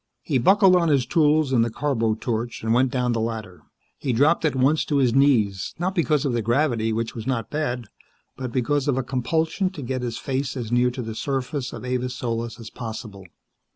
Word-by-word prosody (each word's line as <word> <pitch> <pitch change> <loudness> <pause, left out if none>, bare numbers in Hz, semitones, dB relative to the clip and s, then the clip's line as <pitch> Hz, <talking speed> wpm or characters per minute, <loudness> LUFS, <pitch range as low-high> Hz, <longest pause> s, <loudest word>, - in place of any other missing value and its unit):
He 140 -5 +1
buckled 190 - +5
on 170 -2 +3
his 135 -4 +3
tools 150 0 +2
and 115 -3 +4
the 115 - 0
carbo 115 -3 0
torch, 115 +1 -3
and 110 0 +1
went 125 +2 +3
down 125 -1 0
the 115 -1 0
ladder. 110 -5 -5 0.4
He 130 - -1
dropped 145 +9 +3
at 150 - +1
once 135 +4 +3
to 150 - -1
his 130 -4 +3
knees, 115 -9 +2
not 180 +3 -1
because 155 -6 +1
of 135 - 0
the 120 - 0
gravity, 115 -1 +1
which 115 +1 -2
was 115 +1 -7
not 120 -4 -2
bad, 130 -6 -2 0.5
but 130 -1 -5
because 135 +3 0
of 135 -3 +1
a 130 - 0
compulsion 160 - 0
to 160 -7 -8
get 130 +1 -3
his 120 -2 -3
face 135 0 -3
as 115 -3 -5
near 120 +1 +3
to 125 0 -5
the 110 0 -5
surface 135 +2 -3
of - - -8
Avis 125 0 -2
Solis 115 -1 -3
as 115 -1 -9
possible. 110 -5 -7
125 Hz, 215 wpm, -24 LUFS, 115-145 Hz, 0.5 s, buckled